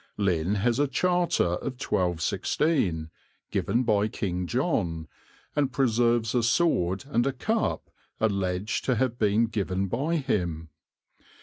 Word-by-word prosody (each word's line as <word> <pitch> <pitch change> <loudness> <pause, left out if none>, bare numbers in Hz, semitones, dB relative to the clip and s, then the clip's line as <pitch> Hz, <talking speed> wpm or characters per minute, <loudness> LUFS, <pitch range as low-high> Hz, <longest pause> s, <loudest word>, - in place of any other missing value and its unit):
Lynn 95 -2 +1
has 115 +5 +1
a 145 - +3
charter 175 +5 +1
of 90 +9 -3
1216, 90 - 0 0.4
given 120 +2 +1
by 105 -3 +2
King 90 -5 -3
John, 95 - -1 0.5
and 140 -3 +1
preserves 120 -3 +2
a 125 - +3
sword 115 - +1
and 120 -2 +1
a - - +2
cup 220 - -2 0.3
alleged 100 -1 -1
to 130 - +2
have 120 0 -1
been 105 +2 +3
given 100 -4 -1
by 145 - 0
him. 85 - -1
110 Hz, 125 wpm, -27 LUFS, 90-130 Hz, 0.5 s, a